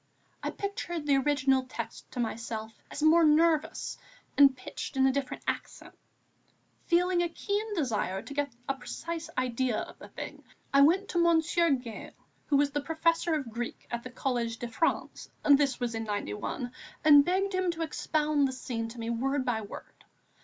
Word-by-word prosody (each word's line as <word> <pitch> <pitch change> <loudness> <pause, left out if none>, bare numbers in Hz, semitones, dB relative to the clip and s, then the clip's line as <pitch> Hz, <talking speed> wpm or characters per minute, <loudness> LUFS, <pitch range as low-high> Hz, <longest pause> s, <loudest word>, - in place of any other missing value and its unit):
I - - -2
pictured 345 -5 -4
the 280 -2 +4
original 270 -1 +3
text 255 - -7
to 250 - -5
myself 225 -1 -3 0.2
as 295 - -5
more 325 +2 +6
nervous 315 0 +2 0.4
and 275 -2 +6
pitched 255 - -6
in 265 - +5
a 265 - +5
different 270 -1 -3
accent. - - -4 0.9
Feeling 355 0 +3
a 345 - 0
keen 415 +4 -2
desire 215 - -1
to 285 - -8
get 285 -1 -1 0.2
a 275 - +1
precise 330 +5 -6
idea 255 -2 0
of - - -8
the - - -10
thing, - - -8 0.3
I 275 - +7
went 360 +8 +4
to 345 - 0
Monsieur 335 0 +3
Gail, 250 -5 -3 0.3
who 285 - +3
was 285 0 +3
the 290 +1 -1
Professor 330 +1 +1
of 275 -7 -4
Greek 235 +1 -5
at 235 0 -2
the 255 - -8
Collège 240 -2 -2
de 240 - -5
France 235 +8 -1
(this 285 -2 +4
was 240 -2 -1
in 225 0 -3
'91), 205 - -3 0.3
and 290 -2 +9
begged 380 +4 0
him 370 -1 +1
to 335 -1 -2
expound 305 -2 +1
the 260 - -4
scene 235 -3 -4
to 235 +1 -10
me 230 0 -2
word 265 +3 0
by 235 -3 0
word. 205 - -11
280 Hz, 175 wpm, -29 LUFS, 245-330 Hz, 0.9 s, and